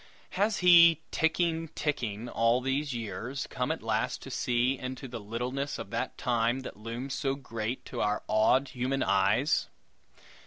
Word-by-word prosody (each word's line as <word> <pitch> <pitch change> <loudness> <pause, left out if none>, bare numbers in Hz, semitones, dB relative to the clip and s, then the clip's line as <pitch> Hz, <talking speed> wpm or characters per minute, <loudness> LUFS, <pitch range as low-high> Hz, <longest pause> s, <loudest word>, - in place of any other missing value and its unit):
Has 205 +3 +1
he, 170 -2 +8
ticking, 165 0 +1
ticking, 120 -7 -2
all 115 +1 +2
these 135 +3 -1
years, 120 +3 -4
come 125 +4 -1
at 160 - -4
last 110 -1 -1
to 135 - -8
see 125 +1 +1
into 130 +1 -6
the 120 -1 -6
littleness 125 +6 -3
of - - -8
that - - -3
Time 120 +1 +1
that - - -8
looms 115 +5 -5
so 135 -1 -1
great 115 -3 -5
to - - -5
our 105 0 0
awed 130 +5 +3
human 130 +2 -1
eyes? 100 +9 +2
125 Hz, 155 wpm, -29 LUFS, 115-140 Hz, -, he